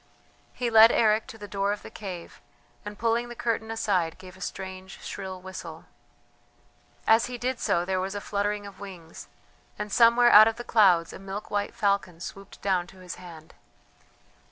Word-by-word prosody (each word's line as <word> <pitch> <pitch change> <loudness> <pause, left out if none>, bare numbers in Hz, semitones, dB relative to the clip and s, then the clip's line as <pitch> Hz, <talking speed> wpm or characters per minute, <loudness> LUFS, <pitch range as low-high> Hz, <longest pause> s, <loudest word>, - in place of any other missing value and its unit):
He 240 -2 -2
led 225 +1 +9
Eric 215 -1 +3
to 225 - -10
the 205 -1 -9
door 200 +1 -1
of 205 - -4
the - - -10
cave, 185 -5 -8 0.4
and 210 -1 -8
pulling 235 +1 0
the 240 - -8
curtain 225 -1 -2
aside, 185 -7 0
gave 185 -1 -12
a 190 - -16
strange, 190 0 -7
shrill 190 -1 -6
whistle. 190 0 -9 1.2
As 225 +2 +4
he 250 -1 -6
did 250 +1 -2
so 175 -5 +1
there 185 0 -1
was 195 +2 -4
a - - -2
fluttering 205 0 -2
of 200 -2 -11
wings, 180 -5 -10 0.5
and 210 0 -5
somewhere 235 +2 +6
out 215 +1 +10
of 225 - 0
the 240 - -7
clouds 185 -8 +4
a - - -9
milk 195 +2 -7
white 205 0 -2
falcon 200 -5 0
swooped 195 +3 -9
down 185 -3 +1
to 190 - -16
his 180 -1 -8
hand. 165 -3 -12
200 Hz, 180 wpm, -27 LUFS, 185-225 Hz, 1.2 s, out